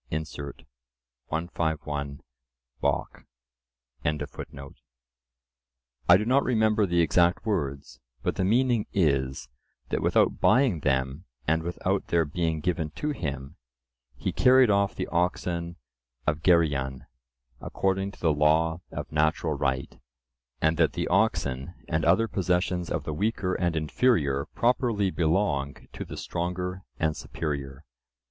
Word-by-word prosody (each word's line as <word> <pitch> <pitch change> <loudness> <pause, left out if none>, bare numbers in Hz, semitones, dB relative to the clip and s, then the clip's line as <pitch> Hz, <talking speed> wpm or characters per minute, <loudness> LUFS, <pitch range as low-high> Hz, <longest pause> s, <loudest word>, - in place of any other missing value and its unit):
Incert. 75 -2 -5 0.6
151 75 -4 -3 0.6
(Bockh).) - - -1 0.8
—I 75 +1 +1 2.0
do 105 - -2
not 130 +4 +3
remember 110 -3 +2
the 85 -1 +2
exact 85 +3 +3
words, 70 - -2 0.2
but - - 0
the 95 - 0
meaning 120 +2 +2
is, 70 -8 +1 0.4
that - - -1
without - - +2
buying 125 - +4
them, 65 +2 -1 0.2
and 80 +1 +2
without 85 +2 -2
their 85 -1 +2
being 80 +1 -1
given 80 -2 -1
to 150 - -2
him, 70 - -5 0.6
he - - -2
carried 130 -3 +5
off 100 0 +2
the - - -2
oxen 85 -1 -1 0.5
of 75 0 0
Geryon, 70 -6 +2 0.5
according 95 0 -1
to - - -16
the 80 -3 +2
law 80 +3 +2
of - - -6
natural 80 +1 +1
right, 65 -2 -2 0.6
and 80 +2 +2
that 80 -2 +3
the - - -2
oxen 70 +5 0
and 80 -1 0
other 115 0 +4
possessions 90 -2 0
of - - -2
the 80 - -4
weaker 100 +1 -1
and 85 -2 0
inferior 75 - +1
properly 115 -5 +2
belong 80 -6 +1 0.2
to - - -5
the - - -8
stronger 90 +2 -3 0.2
and 80 -1 0
superior. 70 -2 -5
80 Hz, 125 wpm, -27 LUFS, 75-95 Hz, 2.0 s, carried